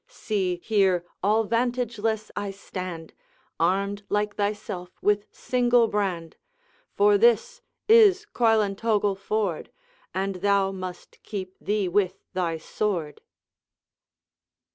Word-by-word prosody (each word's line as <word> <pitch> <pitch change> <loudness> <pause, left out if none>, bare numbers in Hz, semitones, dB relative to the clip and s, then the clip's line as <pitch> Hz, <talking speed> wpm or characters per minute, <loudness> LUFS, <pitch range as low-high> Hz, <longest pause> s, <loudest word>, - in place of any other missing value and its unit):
See, 190 -5 -2
here 190 -5 +2 0.2
all 215 +3 +2
vantageless 230 -2 -1
I 205 -1 -3
stand, 185 -4 -7 0.5
Armed 200 +4 +1
like 205 0 0
thyself 200 -3 -3
with 205 0 +1
single 245 -2 +2
brand; 190 -6 -2 0.6
For 410 0 +4
this 480 +2 +3 0.3
is 425 -3 +6
Coilantogle 210 -3 +2
ford, 200 -4 -2 0.4
And 190 0 -2
thou 200 0 +2
must 185 -2 -8
keep 190 -3 -6
thee 205 -2 0
with 190 0 +1 0.2
thy 175 -3 -1
sword.' 165 -3 -3
205 Hz, 100 wpm, -25 LUFS, 185-225 Hz, 0.6 s, is